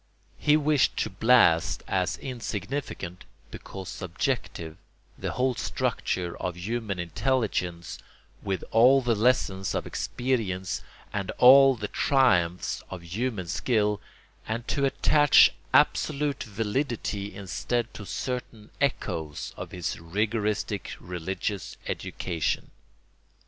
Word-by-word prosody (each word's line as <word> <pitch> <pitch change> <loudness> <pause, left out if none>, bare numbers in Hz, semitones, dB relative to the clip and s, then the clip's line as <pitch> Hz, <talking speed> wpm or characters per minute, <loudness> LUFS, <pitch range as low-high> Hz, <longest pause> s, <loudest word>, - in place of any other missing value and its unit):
He 150 0 +4
wished 150 -2 +2
to - - -1
blast 100 -5 +4
as - - 0
insignificant, 115 -6 -5 0.3
because 95 -2 -8
"subjective," 90 -3 -3 0.4
the - - -4
whole 130 +1 +1
structure 90 -6 -2
of 90 -1 -3
human 105 +1 -3
intelligence, 90 - -1 0.4
with 95 -2 -2
all 130 +4 +6
the 120 -1 +2
lessons 105 -4 +1
of - - -1
experience 110 -8 -2 0.3
and 100 -2 -2
all 135 +1 +8
the 105 -3 -4
triumphs 90 -13 +2
of 90 -2 -7
human 105 +3 -3
skill, 105 +2 0 0.5
and 115 +2 -3
to 140 -1 +1
attach 145 +1 +5 0.2
absolute 145 0 +2
validity 110 -1 -2
instead 115 +4 -2
to 105 - -8
certain 120 -4 -5
echoes 80 - -2
of - - -7
his 90 -4 -4
rigoristic 105 +3 -2
religious 90 +3 -4
education. 85 -5 -2
105 Hz, 105 wpm, -27 LUFS, 90-125 Hz, 0.5 s, all